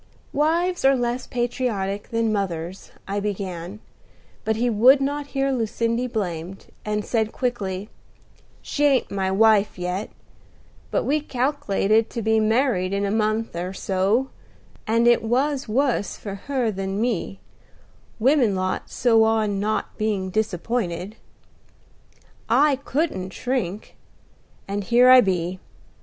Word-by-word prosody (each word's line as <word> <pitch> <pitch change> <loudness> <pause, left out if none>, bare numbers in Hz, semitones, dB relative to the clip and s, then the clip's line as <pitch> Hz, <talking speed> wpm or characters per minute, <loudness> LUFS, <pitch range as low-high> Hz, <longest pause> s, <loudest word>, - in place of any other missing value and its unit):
"Wives 340 +5 +1
are 270 0 +5
less 245 0 -2
patriotic 235 -5 -2
than 230 -1 0
mothers," 180 -2 -4 0.2
I 200 +1 -1
began; 195 -2 -4 0.6
but 220 - 0
he 235 +3 0
would 245 +5 +6
not 285 +1 -2
hear 270 0 +2
Lucindy 230 0 -1
blamed, 190 -5 -4 0.2
and 210 0 -2
said 220 -2 0
quickly, 205 -6 -3 0.8
"She 295 - -2
ain't 275 -3 +2
my 190 -1 -1
wife 210 +1 +3
yet, 180 +3 -3 0.8
but - - 0
we 300 +2 +1
calk'lated 230 -6 +1
to 235 - -4
be 220 +1 +3
married 215 -4 +1
in 200 0 0
a 200 - -1
month 215 -1 0
or 180 +2 -4
so; 195 +8 0 0.6
and 230 +2 +3
it 240 - +5
was 260 +3 0
wus 245 -4 0
for 200 - -7
her 255 -5 0
than 195 -1 -4
for - - -2
me, 220 -5 -2 0.8
women 245 -3 +3
lot 185 0 -2
so 225 -3 +3
on 220 -3 +1
not 215 +2 -2
being 200 -3 -1
disappointed. 205 -1 -2 1.3
I 275 +4 +4
couldn't 275 - -2
shirk, 225 -6 -3 0.7
and 200 +1 -3
here 245 +4 +5
I 255 0 +9
be. 185 -3 -1
220 Hz, 130 wpm, -23 LUFS, 195-250 Hz, 1.3 s, I